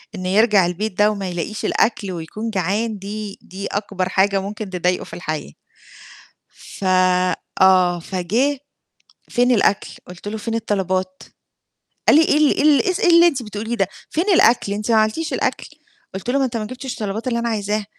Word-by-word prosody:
إنه 185 -1 -4
يرجع 205 -2 +4
البيت 185 +3 -3
ده 210 +1 +4
وما 195 -3 -4
يلاقيش 175 +5 -4
الأكل 205 -4 0
ويكون 180 +7 -5
جعان 205 +3 -1
دي 205 +1 -6
دي 190 +2 -7
أكبر 200 -2 -3
حاجة 195 +1 +2
ممكن 205 +1 -6
تضايقه 180 0 -1
في - - -14
الحياة، 155 - -5 1.0
ف - - -11 0.8
آه 185 -2 +5
فجِه، 210 - -1 0.7
"فين 245 +1 +2
الأكل؟" 205 -3 +2 0.2
قلت 180 +2 -11
له: 215 +1 -3
"فين 225 +2 -4
الطلبات؟" 190 -4 -2 0.8
قال - - +7
لي: 320 - +6
"إيه 295 - +3
ال 300 -1 +4
إيه - - +2
ال 295 -3 +5
إيه 370 - +1
س 370 - -3
إيه 360 - +3
اللي 340 0 +7
أنتِ 280 -7 -1
بتقوليه 215 +2 -4
ده؟ 195 -4 +1 0.2
فين 335 +4 -1
الأكل 235 -9 +4
أنتِ 210 +3 -2
ما 225 - +4
عملتيش 220 +10 0
الأكل؟" - - -2 0.5
قُلت 195 +6 -6
له: 275 - +2
"ما 270 - +2
أنت 240 -2 -3
ما 215 - -3
جِبتش 255 +2 -6
الطلبات 215 +3 -4
اللي 235 -2 0
أنا 235 0 -1
عايزاها." 210 -1 -2
210 Hz, 185 wpm, -20 LUFS, 190-235 Hz, 1.0 s, قال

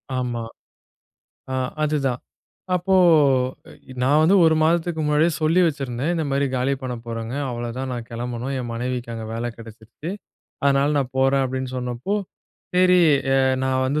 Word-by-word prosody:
ஆமா. 120 -2 -2 1.1
ஆ, - - -1 0.3
அதுதான். 140 -5 0 0.5
அப்போ 180 +2 +1 1.1
நான் 145 +4 +4
வந்து 170 +5 +4
ஒரு 160 -1 +5
மாதத்துக்கு 165 0 +1
முன்னாடியே 150 +3 +3
சொல்லி 165 +4 +3
வச்சிருந்தேன். 140 -1 -2
இந்த 165 -2 -1
மாரி 140 +1 +1
காலி 130 +2 +1
பண்ண 125 -1 -3
போறேங்க, 115 +1 -5 0.2
அவ்ளோதான் 120 +2 -4
நான் 120 -2 -5
கெளம்பனும் 120 +3 -4
என் 120 -2 -4
மனைவிக்கு 125 0 -3
அங்க 115 -1 -6
வேல 115 +1 -3
கெடச்சிருச்சு. 115 +7 -9 0.5
அதனால 140 +1 +3
நான் 130 -2 -2
போறேன் 135 +1 +3
அப்டின்னு 130 0 -4
சொன்னப்போ, 125 +9 -3 0.6
சரி 180 0 +5 0.4
அ - - +4 0.3
நான் 130 0 +1
வந்து 145 +3 0
130 Hz, 140 wpm, -22 LUFS, 120-150 Hz, 1.1 s, ஒரு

